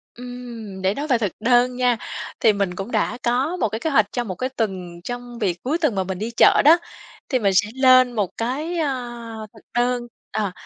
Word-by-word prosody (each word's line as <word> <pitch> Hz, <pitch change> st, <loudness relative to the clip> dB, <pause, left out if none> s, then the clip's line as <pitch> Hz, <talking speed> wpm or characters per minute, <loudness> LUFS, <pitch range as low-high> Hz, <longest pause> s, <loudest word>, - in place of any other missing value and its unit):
Ừm, 240 Hz, -5 st, -8 dB
để 190 Hz, +1 st, +2 dB
nói 290 Hz, +5 st, -4 dB
về 250 Hz, -4 st, +3 dB
thực 205 Hz, -5 st, -1 dB
đơn 245 Hz, +2 st, +3 dB
nha, 250 Hz, -1 st, +2 dB, 0.4 s
thì 220 Hz, -, +5 dB
mình 200 Hz, -3 st, -1 dB
cũng 195 Hz, +5 st, -6 dB
đã 220 Hz, +2 st, 0 dB
có 260 Hz, +9 st, +1 dB
một 225 Hz, -, 0 dB
cái 220 Hz, +2 st, -4 dB
kế 320 Hz, -, -1 dB
hoạch 220 Hz, -8 st, +4 dB
cho 245 Hz, -, -1 dB
một 185 Hz, -5 st, -5 dB
cái 255 Hz, +7 st, -2 dB
tuần 185 Hz, -8 st, -4 dB
trong 245 Hz, 0 st, -6 dB
việc 185 Hz, -5 st, -1 dB
cuối 295 Hz, +6 st, 0 dB
tuần 300 Hz, -11 st, +1 dB
mà 190 Hz, -, +1 dB
mình 185 Hz, -1 st, -5 dB
đi 225 Hz, +3 st, -3 dB
chợ -, -, +6 dB
đó. 325 Hz, +3 st, +8 dB, 0.5 s
Thì 255 Hz, -, +2 dB
mình 200 Hz, -4 st, +2 dB
sẽ 210 Hz, +2 st, +3 dB
lên 255 Hz, -1 st, +6 dB
một 205 Hz, -5 st, 0 dB
cái, 295 Hz, +9 st, -2 dB
ơ, 240 Hz, -6 st, -4 dB
thực 220 Hz, -, -16 dB, 0.2 s
đơn, 245 Hz, 0 st, +1 dB, 0.2 s
ờ, 205 Hz, -4 st, -1 dB
240 Hz, 220 wpm, -22 LUFS, 210-255 Hz, 0.5 s, đó